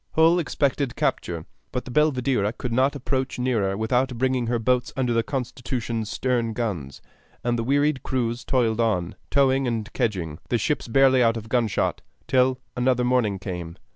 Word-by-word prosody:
Hull 165 Hz, +2 st, +5 dB
expected 140 Hz, -5 st, 0 dB
capture, 85 Hz, -2 st, -1 dB, 0.3 s
but 125 Hz, -, -3 dB
the 130 Hz, -, -7 dB
Belvidera 130 Hz, -7 st, +2 dB
could 125 Hz, -2 st, -3 dB
not 130 Hz, +4 st, +2 dB
approach 130 Hz, -1 st, -2 dB
nearer 110 Hz, -6 st, 0 dB
without 125 Hz, +3 st, 0 dB
bringing 130 Hz, -1 st, +1 dB
her 120 Hz, 0 st, +1 dB
boats 125 Hz, +2 st, +1 dB
under 125 Hz, -3 st, +1 dB
the 115 Hz, -, +3 dB
Constitution's 120 Hz, -3 st, -3 dB
stern 120 Hz, -2 st, 0 dB
guns; 90 Hz, -, -4 dB, 0.4 s
and 120 Hz, 0 st, +1 dB
the 115 Hz, -, -1 dB
wearied 145 Hz, +2 st, +2 dB
crews 120 Hz, -2 st, -2 dB
toiled 120 Hz, -4 st, +1 dB
on, 90 Hz, -7 st, 0 dB, 0.2 s
towing 135 Hz, -1 st, +3 dB
and 115 Hz, -3 st, -3 dB
kedging, 90 Hz, -, -2 dB
the 120 Hz, -, +2 dB
ships 150 Hz, +4 st, -1 dB
barely 130 Hz, +1 st, +5 dB
out 115 Hz, -1 st, +3 dB
of 110 Hz, 0 st, -8 dB
gunshot, 115 Hz, -4 st, 0 dB, 0.3 s
till 130 Hz, 0 st, +3 dB, 0.2 s
another 125 Hz, 0 st, +2 dB
morning 120 Hz, -5 st, +2 dB
came. 90 Hz, -3 st, -6 dB
125 Hz, 165 wpm, -24 LUFS, 110-130 Hz, 0.4 s, Hull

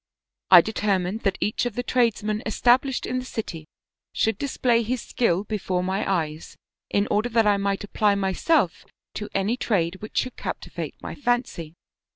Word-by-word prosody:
I 180 Hz, -2 st, +10 dB
determined 200 Hz, -1 st, -1 dB
that 195 Hz, -2 st, 0 dB
each 215 Hz, +3 st, 0 dB
of 230 Hz, -, -6 dB
the 245 Hz, -, -2 dB
tradesmen 220 Hz, -4 st, +1 dB
established 255 Hz, +2 st, +2 dB
in 255 Hz, -, -1 dB
the -, -, -5 dB
city 170 Hz, -10 st, -6 dB, 0.4 s
should 220 Hz, -2 st, 0 dB
display 250 Hz, -4 st, +1 dB
his 240 Hz, +3 st, -2 dB
skill 195 Hz, -6 st, +1 dB
before 190 Hz, -4 st, -2 dB
my 195 Hz, +2 st, -1 dB
eyes 160 Hz, -4 st, -3 dB, 0.3 s
in 200 Hz, +1 st, +1 dB
order 215 Hz, +4 st, +1 dB
that 225 Hz, -1 st, +3 dB
I 205 Hz, -1 st, +4 dB
might 200 Hz, 0 st, -1 dB
apply 205 Hz, 0 st, +1 dB
myself 195 Hz, -, +1 dB, 0.3 s
to 210 Hz, -, -5 dB
any 200 Hz, +5 st, +1 dB
trade 185 Hz, -7 st, 0 dB
which 215 Hz, -, -8 dB
should 255 Hz, -, 0 dB
captivate -, -, -5 dB
my -, -, -5 dB
fancy. 240 Hz, -, -2 dB
210 Hz, 165 wpm, -24 LUFS, 190-240 Hz, 0.4 s, I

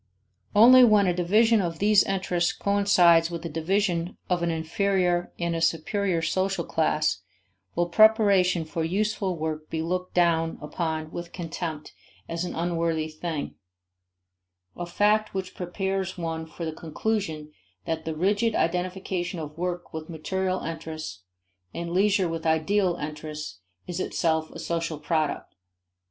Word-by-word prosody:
Only 250 Hz, +4 st, +9 dB
when 210 Hz, -4 st, +5 dB
a 180 Hz, -, +2 dB
division 210 Hz, +6 st, +3 dB
of 170 Hz, -3 st, -3 dB
these 205 Hz, +1 st, +5 dB
interests 180 Hz, -3 st, 0 dB
coincides 180 Hz, -5 st, +4 dB
with 170 Hz, -1 st, -6 dB
a -, -, -3 dB
division 175 Hz, +2 st, -1 dB
of 175 Hz, -1 st, +2 dB
an 170 Hz, -, 0 dB
inferior 175 Hz, +2 st, 0 dB
and 170 Hz, -1 st, -1 dB
a 165 Hz, -, -2 dB
superior 170 Hz, +2 st, 0 dB
social 185 Hz, +1 st, 0 dB
class 155 Hz, -, 0 dB, 0.5 s
will 175 Hz, 0 st, +1 dB
preparation 195 Hz, -3 st, +4 dB
for 160 Hz, +1 st, -3 dB
useful 195 Hz, +1 st, -1 dB
work 155 Hz, -1 st, -4 dB
be 160 Hz, 0 st, -2 dB
looked 180 Hz, +2 st, -3 dB
down 165 Hz, -2 st, +2 dB
upon 160 Hz, 0 st, -3 dB
with 175 Hz, 0 st, -6 dB
contempt 165 Hz, -3 st, -5 dB, 0.3 s
as 165 Hz, +1 st, -3 dB
an 180 Hz, -, -4 dB
unworthy 165 Hz, -2 st, -1 dB
thing: 155 Hz, -1 st, -4 dB, 1.2 s
a 175 Hz, -, -5 dB
fact 210 Hz, +4 st, +2 dB
which 185 Hz, -1 st, -4 dB
prepares 190 Hz, +1 st, -3 dB
one 165 Hz, -1 st, -4 dB
for 165 Hz, +1 st, -7 dB
the 160 Hz, -, -3 dB
conclusion 160 Hz, -2 st, -3 dB, 0.3 s
that 160 Hz, -1 st, -2 dB
the 160 Hz, -1 st, -4 dB
rigid 205 Hz, +7 st, +1 dB
identification 180 Hz, +1 st, -1 dB
of 150 Hz, -1 st, -7 dB
work 175 Hz, +1 st, -4 dB
with 160 Hz, +1 st, -6 dB
material 185 Hz, +3 st, -2 dB
interests, 160 Hz, -, -6 dB, 0.5 s
and 170 Hz, 0 st, -4 dB
leisure 195 Hz, 0 st, +3 dB
with 165 Hz, -1 st, -3 dB
ideal 175 Hz, +4 st, +2 dB
interests 150 Hz, -, -6 dB, 0.3 s
is 180 Hz, 0 st, -5 dB
itself 160 Hz, -3 st, 0 dB
a -, -, -10 dB
social 165 Hz, -2 st, -2 dB
product. 155 Hz, 0 st, -2 dB
170 Hz, 140 wpm, -26 LUFS, 160-190 Hz, 1.2 s, Only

